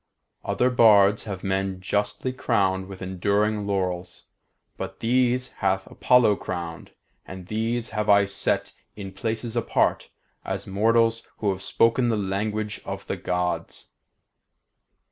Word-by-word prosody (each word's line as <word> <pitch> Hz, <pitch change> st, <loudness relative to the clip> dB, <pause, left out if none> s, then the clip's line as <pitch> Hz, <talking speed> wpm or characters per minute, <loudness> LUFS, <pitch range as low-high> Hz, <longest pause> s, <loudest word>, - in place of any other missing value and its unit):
Other 125 Hz, +1 st, +1 dB
bards 105 Hz, -4 st, +5 dB
have 95 Hz, -3 st, -6 dB
men 95 Hz, -1 st, -1 dB
justly 105 Hz, +6 st, -2 dB
crowned 95 Hz, -7 st, 0 dB
with 95 Hz, -1 st, -9 dB
enduring 100 Hz, +3 st, 0 dB
laurels, 90 Hz, -3 st, -2 dB, 0.5 s
but -, -, -7 dB
these 125 Hz, +1 st, +1 dB
hath 95 Hz, -1 st, +1 dB
Apollo 120 Hz, -5 st, +3 dB
crowned, 85 Hz, -2 st, -6 dB, 0.4 s
and 95 Hz, -1 st, -8 dB
these 115 Hz, +3 st, -2 dB
have 105 Hz, -1 st, -2 dB
I 100 Hz, 0 st, +6 dB
set 100 Hz, 0 st, -1 dB, 0.2 s
in 100 Hz, -2 st, -7 dB
places 110 Hz, +4 st, -3 dB
apart, 120 Hz, -, +1 dB, 0.3 s
as -, -, -4 dB
mortals 115 Hz, +3 st, +2 dB
who 105 Hz, -2 st, 0 dB
have 95 Hz, 0 st, -5 dB
spoken 115 Hz, +5 st, +2 dB
the 110 Hz, -, +1 dB
language 105 Hz, +2 st, -2 dB
of -, -, -6 dB
the -, -, -3 dB
Gods. 90 Hz, 0 st, -3 dB
100 Hz, 125 wpm, -25 LUFS, 95-115 Hz, 0.5 s, I